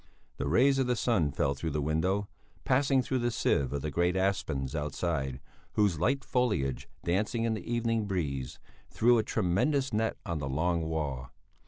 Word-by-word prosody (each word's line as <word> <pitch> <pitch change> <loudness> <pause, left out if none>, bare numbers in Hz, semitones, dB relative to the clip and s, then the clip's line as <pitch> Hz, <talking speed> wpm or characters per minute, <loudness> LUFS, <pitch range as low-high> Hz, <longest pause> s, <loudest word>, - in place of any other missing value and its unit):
The 70 - -2
rays 135 - +4
of 130 - +1
the 125 - +2
sun 100 - +1
fell 70 - 0
through 70 +4 -4
the 75 - -2
window, 85 +7 0 0.4
passing 135 0 +3
through 130 +2 -1
the 120 0 +1
sieve 70 - +1
of 70 -1 -3
the 75 - -2
great 85 +4 +1
aspens 80 -8 -1
outside, 75 -3 -2 0.3
whose 100 -7 +2
light 135 - +1
foliage, 105 - 0
dancing 105 +7 0
in 115 -1 +1
the 110 - -5
evening 115 -2 0
breeze, 70 -9 -2 0.3
threw 120 +1 +4
a - - +1
tremulous 115 - +1
net 110 +1 0
on 85 -2 -2
the 70 -2 -3
long 85 +5 +1
wall. 70 -6 -3
90 Hz, 175 wpm, -30 LUFS, 75-115 Hz, 0.4 s, rays